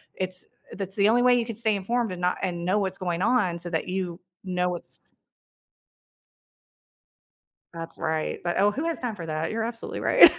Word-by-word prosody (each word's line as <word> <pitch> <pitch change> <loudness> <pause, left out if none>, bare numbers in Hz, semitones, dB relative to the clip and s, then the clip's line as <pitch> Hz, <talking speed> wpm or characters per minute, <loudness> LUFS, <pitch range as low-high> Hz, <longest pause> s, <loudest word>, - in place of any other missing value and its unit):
it's 185 0 0 0.3
uh, - - -7
that's 195 -1 -3
the 205 0 +4
only 240 +2 +5
way 250 0 +6
you 235 - 0
can 230 -1 -5
stay 220 -1 +2
informed 230 +3 0
and 180 -1 -5
not 180 0 +2
and 175 -2 -2
know 190 +4 +3
what's 190 -1 -1
going 175 -2 -2
on 190 -6 +2
so 175 +1 -3
that 160 -2 -1
you 180 -2 -2 0.2
know 180 -1 0
what's 175 -1 -5 2.7
That's 165 0 -6
right. 160 0 -1
But, 175 0 0
oh, 205 +1 +5
who 285 +9 -3
has 335 -2 -1
time 240 -4 -3
for 170 - -6
that? 155 0 -2
You're 225 0 -1
absolutely 230 0 -4
right. - - +8
190 Hz, 195 wpm, -26 LUFS, 175-225 Hz, 2.7 s, right